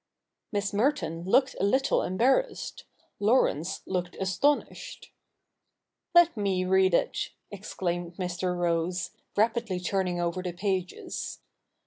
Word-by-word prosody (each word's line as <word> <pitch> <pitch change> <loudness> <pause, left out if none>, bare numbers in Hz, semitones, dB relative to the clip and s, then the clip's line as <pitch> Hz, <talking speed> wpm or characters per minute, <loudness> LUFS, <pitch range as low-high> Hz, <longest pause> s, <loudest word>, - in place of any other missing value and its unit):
Miss 205 -2 -1
Merton 205 - 0
looked 260 +7 +3
a - - 0
little 265 +7 +3
embarrassed; 255 - 0 0.3
Laurence 195 - +2
looked 180 -1 -3
astonished. 200 +10 -1 0.5
' - - -42
Let 345 -3 +7
me 195 -3 0
read 190 -1 +4
it,' - - 0 0.2
exclaimed 175 -3 -4
Mr. 180 0 -2
Rose, 175 +1 0 0.3
rapidly 225 -3 +1
turning 180 -1 -1
over 175 +1 -1
the 180 -1 -4
pages. 185 0 -3
190 Hz, 110 wpm, -28 LUFS, 180-215 Hz, 0.5 s, Let